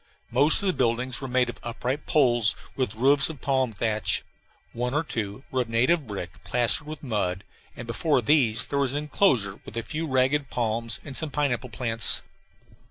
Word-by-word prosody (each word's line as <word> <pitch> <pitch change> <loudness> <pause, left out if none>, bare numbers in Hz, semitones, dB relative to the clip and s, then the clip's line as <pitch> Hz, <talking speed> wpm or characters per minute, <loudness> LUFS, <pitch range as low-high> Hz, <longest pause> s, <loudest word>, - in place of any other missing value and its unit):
Most 145 +10 +5
of - - 0
the 185 - +3
buildings 125 +1 -1
were 135 - -4
made 125 0 +2
of 120 - -7
upright 125 +4 -4
poles 120 -7 +3 0.2
with 125 -6 -2
roofs 140 +5 +3
of 155 -4 -8
palm 130 -2 +1
thatch. 110 0 0 0.5
One 125 +3 -2
or 150 - +2
two 110 -4 -4
were 130 - +1
of 120 - -4
native 130 +6 +2
brick, 95 -5 -7
plastered 120 +1 +2
with 155 0 -7
mud, 100 -6 -1 0.3
and 120 - -7
before 140 +5 +1
these 115 -6 +3
there 140 - -2
was 135 -2 +1
an - - -1
enclosure 135 - +1
with - - -9
a 115 - -2
few 160 +5 -3
ragged 135 +1 +1
palms, 115 -1 -2
and 140 -3 -8
some 160 +1 0
pineapple 135 -3 -1
plants. 115 0 +2
125 Hz, 185 wpm, -26 LUFS, 115-140 Hz, 0.5 s, Most